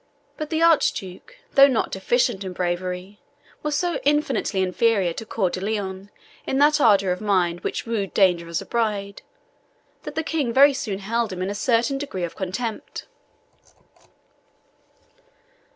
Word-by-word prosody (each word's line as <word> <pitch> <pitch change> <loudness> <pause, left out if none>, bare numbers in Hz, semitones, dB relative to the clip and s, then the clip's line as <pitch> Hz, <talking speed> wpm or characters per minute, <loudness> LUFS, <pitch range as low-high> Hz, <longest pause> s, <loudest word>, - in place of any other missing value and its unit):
But 305 -1 -5
the 325 0 0
Archduke, 285 - +1 0.2
though 275 0 +8
not 255 -5 0
deficient 215 +1 0
in 185 -1 -6
bravery, 180 +2 -3 0.4
was 300 -1 -2
so 345 +3 -1
infinitely 290 -9 +1
inferior 190 -1 +1
to 225 - -8
Coeur 190 -6 0
de 185 - -4
Lion 195 -2 -4 0.4
in 265 - 0
that 295 +1 +4
ardour 200 -6 +4
of 180 - -3
mind 180 -5 +1
which - - -4
wooed 220 -4 -2
danger 180 -4 +2
as 170 - -2
a - - -16
bride, 205 -4 -2 0.8
that - - -8
the 320 - -1
King 300 -6 -1
very 280 +2 +7
soon 210 -7 -3
held 225 +2 -2
him 185 0 -4
in 190 - -2
a - - -3
certain 235 +5 +1
degree 270 -11 -5
of 170 - -4
contempt. 205 +5 -5
205 Hz, 150 wpm, -23 LUFS, 185-265 Hz, 0.8 s, though